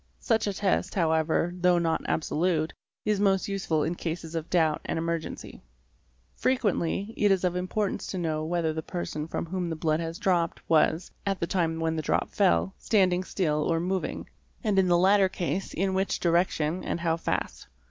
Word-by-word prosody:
Such 225 -3 +1
a 200 - 0
test, 190 -1 0
however, 160 0 +1
though 180 0 +3
not 165 -1 +1
absolute, 160 0 0 0.3
is 210 -2 +1
most 195 -2 +2
use 195 -1 -4
ful 155 -2 +2
in 170 - -1
cases 165 -1 -5
of 165 0 -4
doubt 160 -4 +2
and - - -3
emergency. 165 0 -4 0.7
Frequently 210 -5 0
it 205 - +3
is 190 -2 +2
of 180 -1 +1
importance 185 +3 -2
to 190 - -4
know 160 -3 -1
whether 165 -1 0
the 160 - -3
person 155 -3 -4
from 165 - -3
whom 180 0 -3
the 165 - -2
blood 155 0 0
has 165 0 -4
dropped 175 -4 0
was, 160 +2 +2
at 195 -1 -1
the - - 0
time 165 -3 0
when 160 0 0
the - - 0
drop - - 0
fell, 85 +2 +2
stand 190 -5 +3
ing 180 +1 0
still 155 -6 0
or 165 +2 +1
moving, 185 +2 -2 0.4
and 210 -4 +2
in 190 - +3
the 175 -1 +4
latter 190 +2 +5
case 185 +1 -3
in 190 +2 0
which 190 +1 0
direction 170 -1 +1
and 170 - -3
how 165 -1 +1
fast. 165 - -3
175 Hz, 190 wpm, -27 LUFS, 160-190 Hz, 0.7 s, latter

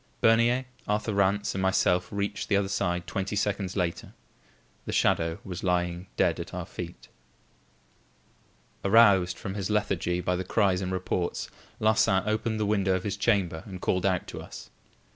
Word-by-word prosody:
Bernier, 115 +3 +4 0.2
Arthur 105 +1 0
Rance 100 +1 +1
and 95 - -2
myself 95 -1 +2
reached 100 0 -3
the 100 - +4
other 100 -1 0
side 90 -3 -1
twenty 95 +3 -3
seconds 100 -2 -1
later. 90 -3 -2 0.7
The - - -2
shadow 80 0 +2
was 90 -3 -6
lying 90 0 0
dead - - +2
at - - -6
our - - -4
feet. 85 -9 -8 1.8
Aroused 100 -4 +5
from 95 - -5
his 100 -1 -3
lethargy 95 -4 0
by 90 0 0
the 90 - -2
cries 95 -1 +1
and 95 -1 -3
reports, 90 -1 -2 0.3
Larsan 110 -3 +3
opened 110 +1 -1
the 105 - +1
window 100 -2 +2
of 95 - -3
his 100 -2 -2
chamber 100 -6 +1
and 95 -2 -7
called 90 0 0
out 90 -2 0
to - - -7
us. - - -11
95 Hz, 160 wpm, -27 LUFS, 90-105 Hz, 1.8 s, Aroused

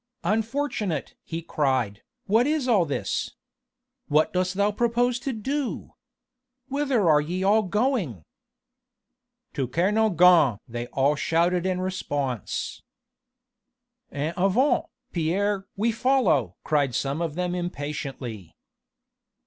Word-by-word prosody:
"Unfortunate!" 215 - -1
he 165 0 -5
cried, 130 -10 0 0.2
"what 225 +5 +3
is 300 -3 0
all 210 -8 +4
this? 145 - -3 0.7
What 150 +2 +2
dost 185 0 0
thou 200 +1 +2
propose 240 +2 +1
to 270 +2 -3
do? 265 +4 -3 0.8
Whither 270 -8 +1
are 150 -2 +5
ye 180 +5 -3
all 210 +3 +4
going?" 205 - -1 1.3
"To 135 -4 -1
Kernogan!" 180 - +4
they 120 0 -5
all 140 +4 +2
shouted 170 +4 +1
in 185 -1 -1
response. 145 - -3 1.3
"En 150 +3 -2
avant, 195 +10 +2 0.3
Pierre! 195 +4 0
we 225 +3 +2
follow!" 255 0 +2
cried 145 -5 +1
some 140 +5 -1
of 165 -3 -2
them 180 0 -1
impatiently. 140 - -5
180 Hz, 110 wpm, -25 LUFS, 145-220 Hz, 1.3 s, are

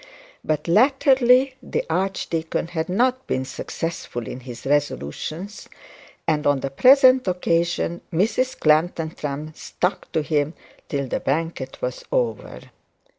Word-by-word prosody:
But 155 +1 -1
latterly 260 - +4
the - - -3
archdeacon 165 -2 -2
had 165 -1 -3
not 255 +7 +1
been 130 0 -1
successful 130 -5 -5
in 125 - -6
his 120 -2 -10
resolutions; 145 - -2 0.6
and 150 -2 +1
on 145 -2 +2
the 135 - -3
present 255 - +6
occasion 175 -1 0
Mrs 225 +9 0
Clantantram 155 -2 0
stuck 180 +2 -3
to 160 - +1
him 150 +1 0 0.3
till 140 -3 -2
the - - -2
banquet 155 -1 -2
was 125 0 -3
over. 110 - -1
165 Hz, 120 wpm, -23 LUFS, 145-200 Hz, 0.6 s, present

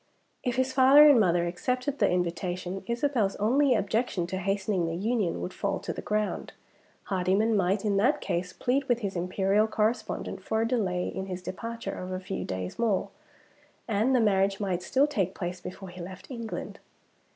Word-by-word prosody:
If 245 -1 -1
his 260 0 0
father 275 +3 +8
and 285 -5 +7
mother 175 -4 +3
accepted 250 +10 -2
the - - +4
invitation, 180 +1 -2
Isabel's 235 -4 0
only 255 +5 +3
objection 205 -2 0
to 185 +2 -4
hastening 195 -2 0
the 165 - -2
union 210 -1 -1
would 180 - -4
fall 200 -1 -1
to - - -4
the - - -6
ground. 210 0 -2 0.5
Hardyman 195 +4 +1
might, 195 +2 +1
in 200 -2 +2
that 250 +9 +3
case, 180 +1 -2
plead 265 +2 0
with 240 -1 +1
his 200 -2 -3
Imperial 195 +4 +1
correspondent 220 +2 -1
for 220 0 -1
a - - 0
delay 190 -8 0
in 190 0 -5
his 180 -1 -5
departure 230 +6 -5
of 185 0 -6
a 185 - -2
few 190 +1 -4
days 95 -1 -5
more; 220 -5 +1 0.8
and 225 +4 +2
the - - +4
marriage 195 -2 +2
might 185 -4 -1
still 265 +9 +2
take 195 - -1
place 175 0 -4
before 185 +1 -8
he 180 0 -9
left 185 +8 -9
England. 230 -3 -6
200 Hz, 180 wpm, -28 LUFS, 185-235 Hz, 0.8 s, father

